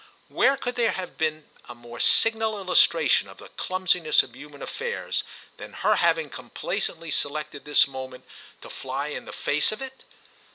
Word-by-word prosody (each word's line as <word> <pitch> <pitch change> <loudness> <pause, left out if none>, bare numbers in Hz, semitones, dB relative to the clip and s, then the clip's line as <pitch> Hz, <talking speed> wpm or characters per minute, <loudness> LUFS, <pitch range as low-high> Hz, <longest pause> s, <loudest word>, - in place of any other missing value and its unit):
Where 275 0 +3
could 245 -1 -3
there 240 -2 +2
have 185 -1 -5
been 155 -1 -1 0.2
a 120 - -8
more 120 0 -11
signal 220 -1 +3
illustration 195 - +4
of - - -13
the - - -12
clumsiness 180 -4 +2
of 125 - -14
human 145 +1 -10
affairs 475 +1 -3 0.3
than - - -9
her - - +2
having 485 - +2
complacently 165 -2 -4
selected 145 0 -3
this 150 -1 +5
moment 130 -1 -8 0.4
to - - -10
fly 135 +3 -4
in - - -5
the - - -8
face 150 +6 +1
of 215 - -5
it? 265 0 -8
155 Hz, 165 wpm, -26 LUFS, 140-220 Hz, 0.4 s, this